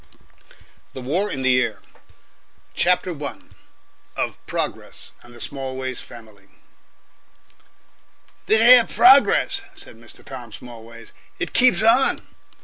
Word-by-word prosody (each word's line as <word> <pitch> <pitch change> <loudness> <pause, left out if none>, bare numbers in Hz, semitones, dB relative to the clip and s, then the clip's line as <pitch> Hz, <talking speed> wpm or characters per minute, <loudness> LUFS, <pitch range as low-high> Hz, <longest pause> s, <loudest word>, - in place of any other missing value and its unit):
K. - - -26 0.8
THE 130 - -8
WAR 180 +11 -1
IN 135 - -5
THE 130 -1 +3
AIR 105 -5 -3 0.9
CHAPTER 180 -3 0
I. 140 - -6 0.8
OF - - -5
PROGRESS - - -5
AND 120 - -17
THE - - -14
SMALLWAYS 130 -1 -5
FAMILY 110 -4 -15
1 - - -32 1.9
"This 220 +1 +4
here 240 0 +7
Progress," 335 - +4
said 120 - -10
Mr. 115 -1 -17
Tom 125 -4 -10
Smallways, 115 0 -12 0.3
"it - - -5
keeps 250 -3 +4
on." 235 +4 +3
130 Hz, 120 wpm, -21 LUFS, -, 1.9 s, here